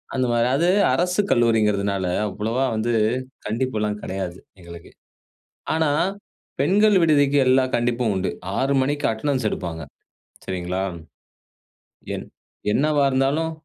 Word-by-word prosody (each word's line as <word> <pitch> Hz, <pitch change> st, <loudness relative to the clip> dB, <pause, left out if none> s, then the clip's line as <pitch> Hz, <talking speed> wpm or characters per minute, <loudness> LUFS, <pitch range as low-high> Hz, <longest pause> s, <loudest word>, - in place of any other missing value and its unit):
அந்த 130 Hz, -, +1 dB
மாரி 120 Hz, 0 st, +2 dB
அது 165 Hz, +5 st, +2 dB, 0.3 s
அரசு 180 Hz, +3 st, +1 dB
கல்லூரின்கிறதுனால 105 Hz, -4 st, +2 dB, 0.2 s
அவ்வளவா 110 Hz, +6 st, -2 dB
வந்து 115 Hz, +2 st, -1 dB, 0.5 s
கண்டிப்புல்லாம் 110 Hz, -2 st, -2 dB
கெடையாது 95 Hz, -2 st, -5 dB, 0.2 s
எங்களுக்கு. 85 Hz, -1 st, -12 dB, 0.8 s
ஆனா, 160 Hz, -2 st, +1 dB, 0.7 s
பெண்கள் 205 Hz, +7 st, +4 dB
விடுதிக்கு 145 Hz, -3 st, +3 dB
எல்லாம் 130 Hz, 0 st, +3 dB
கண்டிப்பும் 120 Hz, -1 st, 0 dB
உண்டு. 95 Hz, 0 st, -1 dB, 0.3 s
6 135 Hz, +1 st, +1 dB
மணிக்கு 145 Hz, +2 st, -1 dB
அட்டெண்டன்ஸ் 130 Hz, +2 st, -1 dB
எடுப்பாங்க. 80 Hz, -5 st, -5 dB, 0.6 s
சரிங்களா? 90 Hz, 0 st, -3 dB, 1.3 s
என் -, -, -6 dB, 0.5 s
என்னவா 145 Hz, +3 st, +2 dB
இருந்தாலும் 135 Hz, +5 st, +1 dB
120 Hz, 105 wpm, -22 LUFS, 105-145 Hz, 1.3 s, பெண்கள்